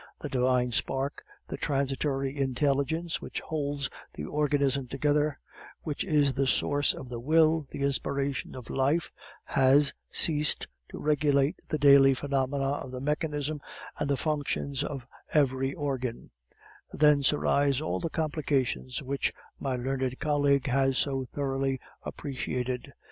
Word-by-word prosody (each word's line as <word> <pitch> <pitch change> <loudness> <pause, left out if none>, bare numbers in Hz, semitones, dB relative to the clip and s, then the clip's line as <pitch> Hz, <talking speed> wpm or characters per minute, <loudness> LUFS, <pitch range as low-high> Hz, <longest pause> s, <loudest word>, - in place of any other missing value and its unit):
The 150 - -5
divine 125 -1 +2
spark, 135 +4 -1 0.3
the - - -5
transitory 135 0 -1
intelligence 140 +4 0
which - - -4
holds 145 -3 -2 0.3
the - - -5
organism 140 -3 +1
together, 145 +2 +1 0.5
which 150 -2 -2
is 145 -6 +2
the 135 0 0
source 145 +2 +2
of 130 - -8
the 120 -1 -5
will, 155 +3 +3
the 140 - -4
inspiration 140 0 -1
of 125 -2 -8
life, 140 +6 +1 0.3
has 140 +1 +4 0.2
ceased 150 -2 +1 0.2
to - - -8
regulate 145 +1 +2
the 155 - -1
daily 140 -2 +7
phenomena 135 0 -1
of 140 -2 -4
the 130 0 -6
mechanism 150 +1 -1 0.4
and 145 - -1
the 140 - +2
functions 145 -2 -1
of 135 -5 -5 0.3
every 135 -2 +2
organ; 130 -5 -3 0.6
thence 150 -2 +4
arise 140 -2 +2
all 155 - -2
the 165 - -2
complications 145 -4 -1
which 135 +1 -1 0.3
my 135 -2 -1
learned 130 0 -2
colleague 145 -2 +2
has 135 0 +2
so 135 -2 0
thoroughly 135 -1 -1 0.2
appreciated. 125 -2 -4
140 Hz, 130 wpm, -29 LUFS, 135-150 Hz, 0.6 s, daily